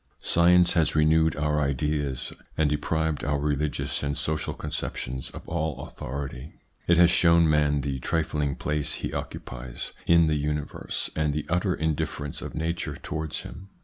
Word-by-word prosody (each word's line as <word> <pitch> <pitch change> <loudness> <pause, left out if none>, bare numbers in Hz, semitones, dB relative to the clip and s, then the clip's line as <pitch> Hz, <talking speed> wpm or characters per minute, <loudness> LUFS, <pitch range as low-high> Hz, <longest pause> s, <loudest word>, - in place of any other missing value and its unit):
Science 90 +1 +5
has 80 -4 +2
renewed 80 0 +4
our 75 +1 +1
ideas, 70 -1 -1 0.2
and 75 -2 +2
deprived 80 +1 0
our 75 +1 +1
religious 75 0 -1
and 70 -1 -1
social 75 0 -1
conceptions 65 +2 -4
of - - -11
all 80 -5 -2
authority. 70 +1 -6 0.3
It 85 - +5
has 85 0 +7
shown 85 -1 +5
man 75 -2 +3
the 70 -1 -2
trifling 75 -1 -1
place 75 -1 -1
he - - -4
occupies - - -6
in 85 0 +6
the 75 -1 +1
universe, 75 0 -3
and 75 -2 0
the 75 - -2
utter 90 +2 +1
indifference 75 -2 -2
of - - -7
Nature 80 -1 -2
towards 80 +2 -4
him. 95 +2 -10
75 Hz, 150 wpm, -26 LUFS, 70-80 Hz, 0.3 s, has